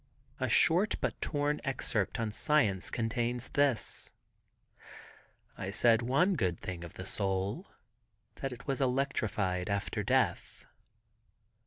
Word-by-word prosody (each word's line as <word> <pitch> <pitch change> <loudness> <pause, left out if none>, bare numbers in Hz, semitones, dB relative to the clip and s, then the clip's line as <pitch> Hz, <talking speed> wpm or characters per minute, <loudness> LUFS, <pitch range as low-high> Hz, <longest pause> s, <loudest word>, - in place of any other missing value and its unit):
A - - -1
short 180 +6 +5
but - - -3
torn 145 0 -1
excerpt 120 -5 0
on 110 -2 -2
science 105 -7 +2
contains 120 +1 -2
this: 140 -5 +1 1.5
"I 95 - -5
said 115 +3 +4
one 140 +11 +2
good 90 - -1
thing 90 -2 -6
of 85 - -10
the 95 - -7
soul. 95 0 -1 0.7
That 135 - -4
it 125 - -10
was 135 -1 -2
electrified 110 -8 -1
after 100 0 -2
death." - - -1
115 Hz, 120 wpm, -31 LUFS, 95-135 Hz, 1.5 s, short